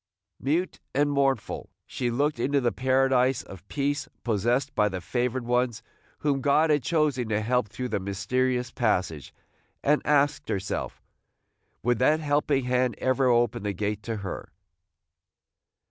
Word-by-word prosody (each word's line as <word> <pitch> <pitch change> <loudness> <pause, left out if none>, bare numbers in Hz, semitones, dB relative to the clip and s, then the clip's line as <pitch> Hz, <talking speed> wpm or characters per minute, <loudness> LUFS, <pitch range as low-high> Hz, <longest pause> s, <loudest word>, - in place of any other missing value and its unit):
Mute 160 +7 -1 0.2
and 145 +1 +3
mournful 135 -4 0 0.2
she 125 - -2
looked 140 +3 0
into 140 +4 +2
the 120 -3 +1
paradise 130 0 +2
of 95 0 -12
peace 145 0 -1
possessed 120 +5 0
by 105 -3 +2
the 95 -2 -4
favored 125 +5 -2
ones 125 -1 0 0.4
whom 140 -2 +1
God 150 +3 +3
had 145 -1 +3
chosen 145 -7 +1
to 105 -1 +1
help 120 +1 +1
through 125 +5 -5
the 105 - -1
mysterious 120 +6 -1
passage, 90 - -1 0.5
and 150 +1 +3
asked 145 0 +2
herself, 95 0 -3 0.8
would 120 -1 +2
that 150 +5 +4
helping 145 -3 +1
hand 125 -1 +1
ever 130 0 +2
open 120 -1 +2
the 100 0 -2
gate 105 +2 -2
to 115 +2 -4
her? 95 - -5
125 Hz, 145 wpm, -27 LUFS, 115-140 Hz, 0.8 s, that